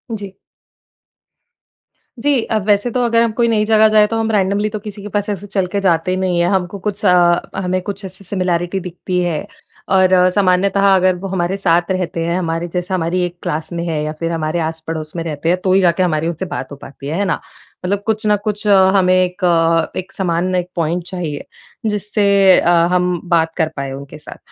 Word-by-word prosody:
जी। 200 -2 -8 1.8
जी। 275 0 +2
अ, 220 - -1
वैसे 205 +3 +2
तो 250 +1 0
अगर 230 0 +3
हम 230 - 0
कोई 235 - +4
नई 215 -2 +2
जगह 220 0 +5
जाएँ 210 0 +6
तो 225 - -2
हम 225 0 0
रैंडमली 200 +1 +1
तो 215 0 -5
किसी 205 0 -7
के 210 - -7
पास 205 +1 -2
ऐसे 205 0 -4
चल 195 -2 -1
के 200 - +2
जाते 185 0 +1
नहीं 180 -2 0
हैं। 170 - +2
हमको 190 0 -1
कुछ 205 +1 -8
अ, 175 -2 +5 0.2
हमें 185 -1 -1
कुछ 200 0 -5
ऐसी 190 +1 -11
सिमिलैरिटी 180 -1 -1
दिखती 180 0 -4
है 165 -4 -2 0.5
और 185 -1 +4 0.3
सामान्यतः 195 0 +2
अगर 185 -1 +3
वो 195 +2 -6
हमारे 185 0 -1
साथ 175 -2 +1
रहते 180 -3 -2
हैं, 170 +2 0
हमारे 165 0 -2
जैसे 180 +2 -4
हमारी 180 +1 0
एक 175 0 -7
क्लास 155 +3 -3
में 170 0 -3
हैं 155 -2 -1
या 155 - -3
फिर 165 0 -2
हमारे 160 +1 -2
आस-पड़ोस 160 0 -5
में 165 - -3
रहते 160 0 -3
हैं 180 - +3
तो 185 - +2
ही 190 - +5
जाके 175 +1 +2
हमारी 160 -2 0
उनसे 170 +2 -3
बात 175 -4 -6
हो - - -6
पाती 140 0 -11
है, 160 +4 -2
है 200 - 0
ना? 180 - -1 0.5
मतलब 200 +2 -1
कुछ 220 0 0
न 210 - +4
कुछ 210 0 -1
अ, 200 - +6 0.2
हमें 185 -1 +4
एक 180 0 0
अ, 165 -1 +2
एक 185 - -8
समान 180 0 -1
एक 180 0 -1
पॉइंट 170 +1 -1
चाहिए 170 -6 -5 0.4
जिससे 210 0 -1 0.3
अ, - - +1 0.2
हम 180 -1 +1
बात 165 -1 +2
कर 160 -3 +2
पाएँ 140 -1 -4
उनके 140 +2 -9
साथ। 150 - -11
180 Hz, 215 wpm, -17 LUFS, 170-200 Hz, 1.8 s, जाएँ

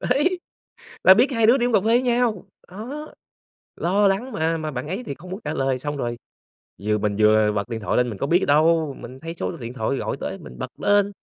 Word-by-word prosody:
Đấy. 320 +8 +1 0.6
Là 190 - +9
biết 245 +8 +3
hai 230 -3 +2
đứa 240 +4 +6
đi 240 - +1
uống 245 - -2
cà 210 - +6
phê 195 - -7
với 235 +2 +4
nhau. 240 -6 +1 0.2
Đó. 250 +11 -8 0.6
Lo 200 +4 +2
lắng, 205 +7 0
mà 160 +1 0
mà 155 -1 -4
bạn 130 -1 -5
ấy 195 +9 -4
thì 140 - -5
không 180 +6 -13
muốn 190 +3 -5
trả 150 +1 -3
lời. 135 -3 0
Xong 145 +3 -4
rồi 120 -3 -3 0.6
vừa 105 +1 +1
mình 105 -1 -1
vừa 110 0 +5
bật 100 0 -3
điện 115 -2 -3
thoại 105 - -1
lên, 125 0 +2
mình 105 - -6
có 140 - -2
biết 175 +5 +3
đâu, 155 0 +3
mình 130 +2 -10
thấy 165 +3 -6
số 170 - -3
điện 120 -3 -7
thoại 130 +2 -1
gọi - - -3
tới - - -4
mình 60 - -12
bật - - -4
lên. 205 0 +3
165 Hz, 245 wpm, -23 LUFS, -, 0.6 s, Là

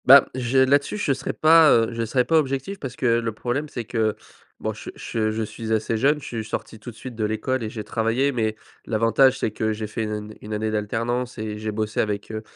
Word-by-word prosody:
Bah 135 +1 +9
j'ai 130 +1 +3
là-dessus 140 +8 +2
je 175 -9 +1
serai - - -3
pas, 160 0 +6
heu, 115 -1 +4
je 115 0 -2
serai 125 +2 +1
pas 165 -1 +4
objectif 140 +7 -2
parce 130 -3 -6
que - - -4
le 115 -1 +2
problème 125 +7 -2
c'est 120 -4 -5
que, 110 -1 0 0.4
bon - - -2
che - - -9
che 110 -1 -2
je 110 +1 -1
suis 110 +1 -6
assez 110 +1 +1
jeune. 140 +6 +3
Je 140 - -11
suis 115 -2 -4
sorti 110 0 -5
tout 120 - -8
de 115 - -11
suite 130 +2 -8
de 110 - -2
l'école 115 +4 -1
et 110 - -3
j'ai 110 -1 -6
travaillé, 115 +6 +1
mais 110 -4 -1 0.3
l'avantage 115 +4 +4
c'est 110 - -1
que 110 +1 -1
j'ai 110 0 -4
fait 110 +1 -3
1 105 - -4
année 105 +1 -10
de - - -18
1 105 +1 -6
année 110 +1 -1
d'alternance 115 +4 -2
et 105 -1 -4
j'ai 110 0 -3
bossé 110 0 -2
avec, 105 0 -1
heu, 110 0 -4
115 Hz, 250 wpm, -23 LUFS, 110-130 Hz, 0.4 s, Bah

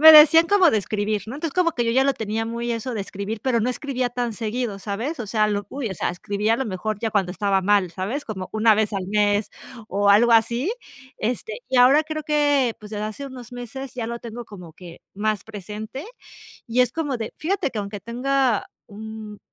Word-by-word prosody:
me 315 +1 +11
decían 320 +2 +9
cómo 380 -4 +5
de 220 - +2
escribir, 210 +1 -1
¿no? 235 - -6
Entonces, 305 +1 -3
como 360 -2 +3
que 240 -4 -1
yo, 230 - +1
ya 265 +3 +3
lo 275 - +3
tenía 220 +1 -2
muy 235 +1 -3
eso 235 +2 -3
de 215 - -2
escribir, 200 +2 -5
pero, 255 -3 +2
no 235 - +1
escribía 255 -2 -2
tan 245 -1 -2
seguido, 220 -1 -3
¿sabes? 225 - -4
O 235 - -4
sea, 215 +1 +2
lo 205 -1 -2
uy, 270 -4 -4
o - - -4
sea, - - -1
escribía 205 +5 0
a - - -2
lo 265 - -1
mejor 215 +1 -3
ya 225 - -1
cuando 195 -4 +1
estaba 195 +1 +1
mal, 195 -2 +3
¿sabes? 205 - -3
Como 190 -4 -5
1 220 0 +5
vez 215 0 +1
al 190 -2 -2
mes, 205 0 +2 0.4
o 200 +1 +1
algo 230 +4 +6
así. 235 - +3 0.5
Este, 250 - -3
y 260 - 0
ahora 265 +5 +6
creo 310 0 -4
que, 290 -5 +2
pues, 210 -1 -12
desde 210 0 -3
hace 215 +6 -5
unos 250 -2 -10
meses 250 +2 -7
ya 235 -3 -3
lo 235 0 -4
tengo 235 +1 -7
como 180 -7 -11
que 175 -2 -12
más 215 0 -1
presente, 215 - -7 0.6
y 240 +1 +1
es 250 -1 +3
como 290 -5 -2
de 225 -2 -5
fíjate 350 -3 0
que 220 - -5
aunque 200 0 -5
tenga 250 +1 0 0.2
un 215 0 -8
225 Hz, 220 wpm, -23 LUFS, 210-260 Hz, 0.6 s, me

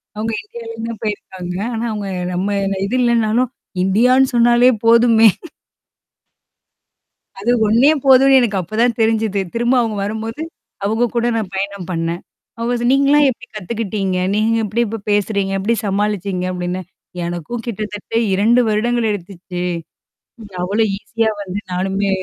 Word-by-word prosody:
அவங்க 220 +2 -2
இந்தியாலருந்து 230 +1 -7
தான் 225 - -8
போயிருக்காங்க. 185 -4 -5 0.2
ஆனா, 225 +1 -3
அவவுங்க 205 -2 -4 0.2
நம்ம 200 +3 -1 0.3
இது 235 +6 -2
இல்லனாலும் 235 +1 +2 0.3
இந்தியான்னு 250 +7 +4
சொன்னாலே 240 +1 +5 0.2
போதுமே. 230 -1 +6 2.1
அது 235 +5 0 0.2
ஒன்னே 245 +8 +5
போதும்னு 270 0 +7
எனக்கு 205 -5 0
அப்பதான் 225 +6 0
தெரிஞ்சுது. 220 -2 +1
திரும்ப 240 +2 +1
அவங்க 220 -2 -2
வரும்போது. 220 +6 -4 0.4
அவங்க 220 +3 +1
கூட 235 0 +1
நான் 210 -4 -2
பயணம் 200 -2 -4
பண்ணேன். 165 +1 -2 0.4
ஓ - - -2 0.3
நீங்கலாம் 280 +2 +4
எப்படி 250 0 -6
கத்துக்கிட்டீங்க? 200 -2 -2 0.2
நீங்க 220 +2 +2
எப்படி 230 +4 -1
இப்ப 225 +2 -4
பேசுறீங்க? 200 -1 +1
எப்படி 220 +5 +1
சமாளிச்சீங்க 200 -2 -1
அப்ப்டின்னு 180 +1 -3 0.4
எனக்கும் 175 +7 -5
கிட்டத்தட்ட 210 -2 -6 0.2
2 225 +6 +4
வருடங்கள் 230 +2 +1
எடுத்துச்சு? 180 -2 -6 1.0
அவ்ளோ 205 +5 +1
ஈஸியா 225 +1 -1
வந்து 195 +1 -4
நானுமே 195 +2 -1
215 Hz, 125 wpm, -18 LUFS, 195-235 Hz, 2.1 s, போதும்னு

